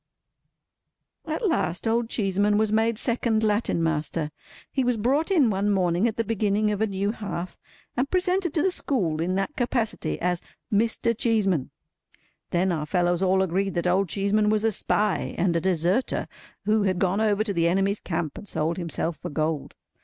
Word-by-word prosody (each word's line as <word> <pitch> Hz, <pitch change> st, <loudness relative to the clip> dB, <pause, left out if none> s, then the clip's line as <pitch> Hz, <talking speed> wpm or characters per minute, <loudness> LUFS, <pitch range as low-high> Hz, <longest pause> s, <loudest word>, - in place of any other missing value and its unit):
At 320 Hz, +8 st, -1 dB
last, 225 Hz, -, 0 dB
Old 230 Hz, 0 st, +1 dB
Cheeseman 205 Hz, -1 st, +1 dB
was 215 Hz, 0 st, +1 dB
made 220 Hz, +1 st, +2 dB
second 230 Hz, -2 st, +1 dB
Latin 210 Hz, -5 st, +1 dB
Master. 155 Hz, -1 st, -1 dB, 0.4 s
He 265 Hz, -, 0 dB
was 245 Hz, -2 st, +1 dB
brought 270 Hz, -, +1 dB
in 300 Hz, -, +4 dB
one 200 Hz, +1 st, 0 dB
morning 185 Hz, +1 st, +2 dB
at 220 Hz, -, -3 dB
the 230 Hz, -, +1 dB
beginning 210 Hz, -1 st, +1 dB
of 205 Hz, 0 st, -2 dB
a 220 Hz, -, +3 dB
new 200 Hz, +1 st, -1 dB
half, 185 Hz, -5 st, -5 dB, 0.4 s
and 260 Hz, +3 st, 0 dB
presented 365 Hz, -1 st, +1 dB
to 310 Hz, -, +2 dB
the 380 Hz, -, +2 dB
school 180 Hz, -, -1 dB
in 180 Hz, +3 st, 0 dB
that 195 Hz, +9 st, -2 dB
capacity 240 Hz, -3 st, -1 dB
as 180 Hz, 0 st, 0 dB, 0.3 s
"Mr. 230 Hz, +2 st, +1 dB
Cheeseman." 205 Hz, -, +1 dB, 0.8 s
Then 180 Hz, +2 st, +1 dB
our 155 Hz, -3 st, -2 dB
fellows 175 Hz, +1 st, +1 dB
all 190 Hz, 0 st, +3 dB
agreed 190 Hz, +2 st, -1 dB
that 170 Hz, -, -1 dB
Old 185 Hz, +1 st, +2 dB
Cheeseman 205 Hz, +3 st, +2 dB
was 215 Hz, 0 st, +1 dB
a 225 Hz, -, +3 dB
spy, 210 Hz, 0 st, 0 dB
and 175 Hz, -1 st, +1 dB
a 165 Hz, -, +1 dB
deserter, 185 Hz, +6 st, +1 dB, 0.4 s
who 215 Hz, +1 st, +3 dB
had 190 Hz, -2 st, +1 dB
gone 190 Hz, +3 st, +1 dB
over 215 Hz, -1 st, +2 dB
to 210 Hz, -2 st, -2 dB
the 170 Hz, -2 st, +2 dB
enemy's 195 Hz, +3 st, +1 dB
camp, 160 Hz, -4 st, -3 dB
and 205 Hz, -, -12 dB
sold 165 Hz, -1 st, -1 dB
himself 170 Hz, -1 st, -3 dB
for -, -, -6 dB
gold. 155 Hz, 0 st, -2 dB
200 Hz, 180 wpm, -25 LUFS, 175-225 Hz, 0.8 s, in